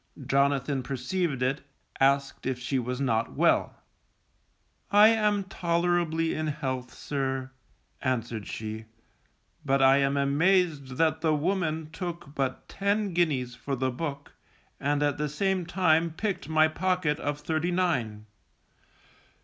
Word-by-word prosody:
Jonathan 140 0 +1
perceived 140 +2 -2
it, 135 +3 0 0.4
asked 140 0 +1
if 130 -1 -1
she 130 +2 -1
was 125 +1 -3
not 115 -4 0
well. - - +2 1.1
I 205 +2 +7
am 210 -3 +2
tolerably 170 -3 0
in 155 0 -2
health, 130 -4 -3
sir, 135 -2 -3 0.5
answered 120 -4 -2
she, 110 0 -6 0.8
_but 135 0 +2
I 135 0 +6
am 140 0 +1
amazed 145 -1 +2
that 160 -1 +2
the 160 -2 +2
woman 160 -1 -1
took 170 -4 -6
but 135 -3 -2
ten 200 0 -1
guineas 145 -8 +1
for 135 +3 -4
the 130 0 -1
book, 145 +1 -5 0.5
and 145 +1 0
at 145 -1 0
the 150 0 -1
same 185 +3 -1
time 170 -2 +3
picked 190 +2 -3
my 155 0 +5
pocket 175 -2 0
of 145 0 -2
thirty 160 +3 -1
nine. 125 -13 -1
150 Hz, 130 wpm, -28 LUFS, 135-175 Hz, 1.1 s, I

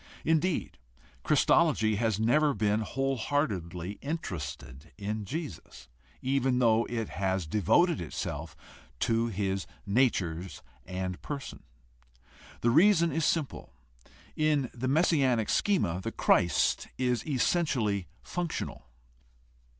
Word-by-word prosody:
Indeed, 160 +2 0 0.4
Christology 110 -1 +3
has 110 -2 0
never 145 +6 +3
been 105 0 +1
whole 135 +4 -1
heartedly 100 - -2
interested 75 - -6
in 105 +1 -4
Jesus, 140 - -7 0.3
even 130 -1 +1
though 115 -2 +3
it 115 -3 -3
has 95 -2 -1
devoted 105 - +2
itself 80 - -5 0.4
to 115 +1 +2
his 95 -2 -2 0.2
natures 95 -6 0 0.2
and 95 -1 -4
person. 140 -2 -6 1.0
The 120 - +3
reason 170 - +5
is 160 -1 0
simple: 155 -5 -2 0.6
in 150 -4 +1
the 125 +2 -3
messianic 135 -6 +2
schema 100 - +1
the - - -4
Christ 85 0 +2
is 125 -2 0
essentially 125 - +1 0.2
functional. 175 - -4
115 Hz, 105 wpm, -29 LUFS, 95-145 Hz, 1.0 s, reason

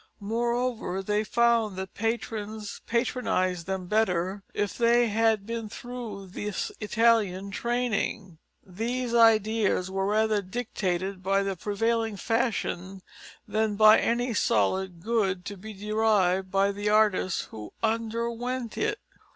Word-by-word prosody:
Moreover, 230 -2 -1
they 210 +2 0
found 235 -2 +2
that 190 0 -6
patrons 220 -1 -3
patronised 205 -8 0
them 190 -1 -3
better 190 -1 0
if 205 -1 -2
they 235 0 +3
had 220 -1 +2
been 230 -1 -4
through 230 -4 -7
this 200 +2 -4
Italian 210 -3 +2
training. 220 -6 -2 0.3
These 235 +6 -3
ideas 220 -4 +3
were 195 0 -1
rather 215 0 +2
dictated 190 -3 -3
by 195 +1 +1
the 195 -1 -2
prevailing 225 +3 -1
fashion 195 -4 -2 0.4
than 215 -1 0
by 215 +1 +7
any 240 +1 0
solid 175 - 0
good 195 -5 0
to 205 - -5
be 215 +3 -9
derived 205 -3 +1
by 195 +1 +2
the 205 +1 -2
artist 210 -4 +2
who 105 -1 -8
underwent 230 +2 -2
it. 430 -1 0
215 Hz, 120 wpm, -27 LUFS, 190-230 Hz, 0.4 s, by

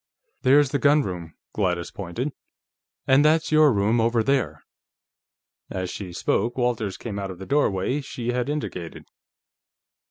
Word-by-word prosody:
"There's 135 +1 +4
the 140 - 0
gunroom." 95 - +1 0.2
Gladys 90 -4 -1
pointed. 105 - -4 0.7
"And 135 +2 +5
that's 155 +1 +3
your 155 -1 +6
room, 110 +2 +2
over 115 0 +2
there." 135 0 0 1.1
As 95 -1 -4
she 95 -4 -6
spoke, 115 +7 -1
Walters 115 -6 -1
came 105 -4 -5
out 100 -1 -4
of 95 - -7
the 95 - -8
doorway 130 0 +1
she 120 -3 -5
had 125 +2 -1
indicated. 90 - -5
120 Hz, 135 wpm, -24 LUFS, 95-140 Hz, 1.1 s, your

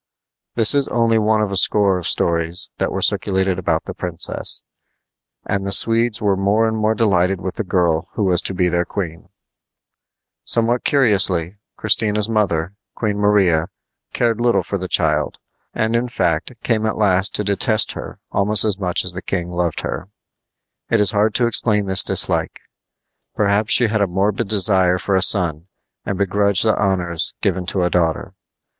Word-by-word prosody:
This 115 +1 +3
is 140 -1 +1
only 115 -1 +1
one 110 0 +1
of 100 - -3
a - - -2
score 100 -1 +3
of 85 - -2
stories 85 +1 -1
that - - -1
were - - -2
circulated 95 -1 0
about 90 - -1
the - - -7
princess, 85 -2 -2 0.8
and 100 -1 -2
the 100 - -3
Swedes 115 +2 +2
were 100 -2 +1
more 100 +4 +1
and 110 - -2
more 110 0 0
delighted 95 -4 +1
with 90 0 -5
the 110 - -4
girl 85 -4 0
who 110 - -2
was 90 -2 +3
to 95 - -2
be 90 0 +1
their 85 0 0
queen. 85 -3 -6 1.1
Somewhat 120 +1 0
curiously, 100 - +2 0.2
Christina's 105 -1 +1
mother, 95 -6 -1 0.2
Queen 105 -2 -2
Maria, 95 -6 +2 0.4
cared 115 -1 0
little 120 0 +2
for 100 - -4
the 95 - -5
child, 75 -4 0 0.3
and, 110 +1 -1
in 120 +1 0
fact, 85 -5 -1
came 110 -2 0
at 110 - -3
last 95 -2 +1
to 105 - 0
detest 105 +2 +2
her - - -8
almost 105 +1 +2
as 100 -2 -1
much 90 -2 -2
as 95 - -3
the 90 +1 -7
king 90 -2 -4
loved 85 -2 -2
her. 90 - -5 0.8
It 115 - +2
is 105 0 +2
hard 105 0 +1
to 125 - +2
explain 105 -3 +1
this 95 -1 +3
dislike. - - 0 0.7
Perhaps 105 +1 +1
she 120 - +5
had 110 -1 0
a 100 - +2
morbid 100 +4 -1
desire 95 -3 +3
for 100 - -3
a 95 - +2
son 85 -4 +2 0.4
and 95 - -2
begrudged 100 +1 +1
the 110 - +3
honors 90 -4 -2
given 90 -2 -1
to 95 -2 0
a 90 - 0
daughter. 85 -2 -1
100 Hz, 175 wpm, -19 LUFS, 90-110 Hz, 1.1 s, she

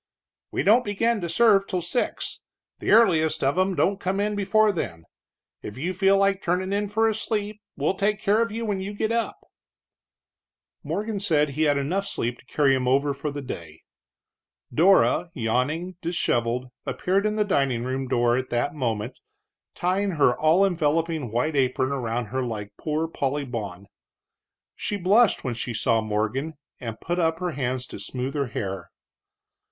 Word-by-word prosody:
"We - - -1
don't 230 +5 +5
begin 220 +1 0
to 170 - -3
serve 195 +2 +4
till 180 -3 -2
six, 175 +8 -2 0.4
the - - -3
earliest 175 -8 +4
of 135 +3 +2
'em 185 +1 +1
don't 195 +2 +1
come 195 +1 -1
in 210 +1 0
before 210 +2 +3
then. 85 - -4 0.6
If 105 - -8
you 175 +7 -2
feel 195 +1 +3
like 195 -1 +2
turnin' 185 +3 -1
in 205 0 -1
for 220 +2 +2
a 220 - +2
sleep, 210 -1 -3 0.2
we'll 145 +6 +1
take 205 +2 0
care 215 +1 +2
of 230 - 0
you 230 +2 -3
when 200 -3 -1
you 200 +2 -5
get 220 +2 -1
up." 230 -2 -1 1.5
Morgan 200 +7 -3
said 155 -7 +2
he 155 +3 0
had 145 - +3 0.3
sleep 120 -10 -2
enough - - -20
to - - -23
carry 140 -3 +3
him 130 -1 0
over 140 +2 +2 0.2
the 145 0 -6
day. 85 -11 -8 0.9
Dora, 180 0 +4
yawning, 145 +10 -1
disheveled, 125 -7 -1
appeared 195 +3 0
in 210 - -1
the 210 -1 +1
dining 135 -10 +1
room 130 +1 -3
door 120 -1 +2
at 130 0 -2
that 120 +4 0
moment, 120 -4 -3 0.6
tying 190 +2 0
her 140 -6 +3
all 165 +5 +4
enveloping 160 - 0
white 125 +7 0
apron 130 0 +1
around 120 -3 -2
her 130 - 0
like 110 -5 -5
Poor 155 +1 -2
Polly 145 -2 -2
Bawn. 100 -7 -6 0.9
She 205 - -3
blushed 200 +4 +3
when 125 - -2
she 120 0 -4
saw 115 0 +2
Morgan, 110 +8 -2 0.2
and 115 -4 -6
put 175 +2 -2
up 160 -1 +1
her 180 0 -2
hands 130 -3 -2
to - - -9
smooth 130 +1 -4
her 140 -3 -1
hair. 95 -5 -5
160 Hz, 170 wpm, -25 LUFS, 125-195 Hz, 1.5 s, don't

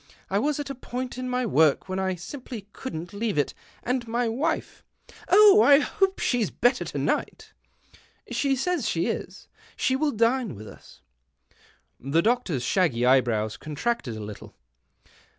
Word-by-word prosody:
I 200 - +2
was 295 +4 0
at 285 -1 -4
a - - -3
point 255 0 -6
in 255 0 -4
my 250 0 0
work 160 -7 +3
when 185 0 -3
I 190 -1 -1
simply 220 - -8
couldn't 175 -9 -7
leave 210 -4 -2
it, 145 - +1 0.3
and 250 -1 -1
my 235 +1 0
wife 295 +8 -2
" - - -23
" - - -20
Oh, 415 +1 +8
I 285 -6 +7
hope 385 +6 0
she's 240 -6 0
better 245 +2 +1
to - - -6
night! - - -2 0.2
" - - -27
" - - -24
She 275 -1 +1
says 285 -3 -1
she 165 0 0
is. - - -5 0.3
She 260 - +1
will 300 +3 +1
dine 230 - +1
with 105 +2 -10
us." - - -15 1.0
The 145 +6 +1
doctor's 220 - 0
shaggy 130 -7 +1
eyebrows 120 -4 +2
contracted 150 - -3
a - - -7
little. 105 0 -10
230 Hz, 170 wpm, -25 LUFS, 160-265 Hz, 1.0 s, Oh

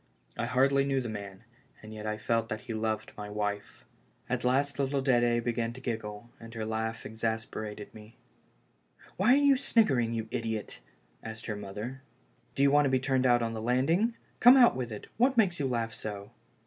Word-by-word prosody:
I - - -2
hardly 135 +2 +3
knew 135 -1 0
the 120 -3 -4
man, 100 -1 -7 0.4
and 110 0 -9
yet 110 0 -6
I 110 0 -2
felt 115 +1 0
that 110 - -4
he 120 -2 -6
loved 110 -1 -2
my 105 -1 -7
wife. 105 -11 -4 0.4
At - - -2
last 135 +2 +1
little 135 0 0
Dedc 120 -3 +2
began 120 -1 -1
to 130 - -10
giggle, 110 -2 -5
and 115 0 -11
her 110 -1 -3
laugh 110 +1 -3
exasperated 110 -1 -4
me. 110 +1 -14 1.0
"Why 220 +7 +5
are 285 +1 +4
you 280 -1 +6
sniggering, 145 - +2
you 110 -1 -3
idiot?" 110 -3 -4 0.4
asked 110 0 -8
her 110 - -3
mother. 105 +6 -7 0.3
" 125 -1 -38
Do 135 - +2
you 140 - +5
want 145 0 +5
to - - +2
be 130 0 +2
turned 130 -1 +1
out 120 -1 +4
on 115 0 -2
the 110 - -5
land 125 +5 +1
ing? 225 +7 +2 0.2
Come, 245 +2 +8
out 245 -2 +6
with 125 -2 -4
it; 105 - -7
what 255 +3 +3
makes 190 -7 +3
you 140 - 0
laugh 115 -3 -2
so?" 100 -2 -6
115 Hz, 200 wpm, -29 LUFS, 110-135 Hz, 1.0 s, Come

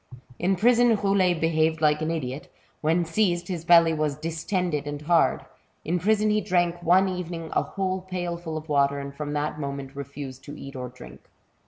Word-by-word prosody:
In 190 +2 +2
prison, 240 +3 +4
Roulet 195 -4 +2
behaved 160 0 +1
like 150 0 +2
an 155 - -1
idiot. 145 -4 -4 0.3
When 165 +3 +2
seized, 175 0 0
his 175 -3 -3
belly 170 -1 +6
was 150 -2 -1
distended 165 -1 -2
and 145 0 -4
hard; 170 +1 +2 0.4
in 175 +3 0
prison 215 +3 +2
he 210 0 +2
drank 175 -2 0
one 180 +3 +4
evening 170 -3 -5
a - - +3
whole 190 -1 -3
pailful 175 -3 -4
of 155 0 -7
water, 140 -1 +2
and 140 0 -6
from 145 +1 -5
that 150 +1 -2
moment 140 -1 -5
refused 140 -1 -7
to 145 +1 -8
eat 135 0 -9
or 125 -1 -5
drink. 125 - -14
165 Hz, 180 wpm, -25 LUFS, 150-180 Hz, 0.4 s, belly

